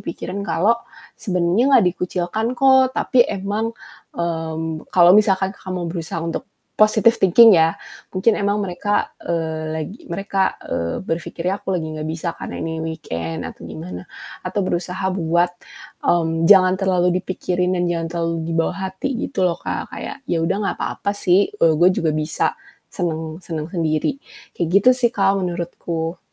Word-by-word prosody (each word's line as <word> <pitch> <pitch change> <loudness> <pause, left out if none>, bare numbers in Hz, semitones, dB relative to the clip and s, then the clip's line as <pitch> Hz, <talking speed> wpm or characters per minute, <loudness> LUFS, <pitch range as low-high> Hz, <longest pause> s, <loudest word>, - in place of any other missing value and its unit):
pikiran 185 +4 -5
kalau 210 +7 +3 0.4
sebenarnya 185 +2 +1
enggak 240 -7 +6
dikucilkan 180 +5 -2
kok, 265 -1 +5
tapi 250 - +4
emang, 205 +3 -2 0.4
mmm, 160 -1 -3
kalau 175 -1 +6
misalkan 195 -2 +3
Kakak 190 - -10
mau 175 -1 -3
berusaha 165 -1 -4
untuk 165 +2 -4 0.3
positive 215 +2 +5
thinking 215 +4 +7
ya, 165 -1 +4 0.4
"Mungkin 195 +4 +3
emang 205 +1 +1
mereka, 195 +2 -1
eee, 160 -2 -2
lagi 160 +8 -5
mereka, 195 +1 -1
eee, 85 0 -3
berpikirnya 170 +3 -3
aku - - -4
lagi 160 -3 -2
enggak 155 0 -4
bisa 165 +1 -3
karena - - -6
ini 160 0 -3
weekend," 85 - -4
atau - - -12
gimana. 90 +2 -7 0.4
Atau 205 - -2
berusaha 180 +2 -2
buat, 175 0 +1 0.5
mmm, 165 -1 +1
jangan 185 -2 +7
terlalu 180 -1 +2
dipikirin 180 -1 -1
dan 175 - 0
jangan 165 -1 -1
terlalu 165 -1 -1 0.2
dibawa 165 0 0
hati 190 +8 -4 0.2
gitu 185 - +1
loh 175 - +1
Kak, - - -5
kayak, - - -7
"Ya 165 -1 +1
udah, 165 - +1
enggak 200 - -1
apa-apa 200 - -2
sih, 195 +1 +2
eee, 165 -6 +4
gue 180 +2 +6
juga 160 - +1
bisa 155 +1 0 0.4
seneng-seneng 160 -2 -4
sendiri." 165 - 0 0.4
Kayak 170 - -1
gitu 250 - +6
sih 245 -2 +3
Kak, 195 -1 +3
menurutku. 170 -1 -3
175 Hz, 155 wpm, -21 LUFS, 165-195 Hz, 0.5 s, thinking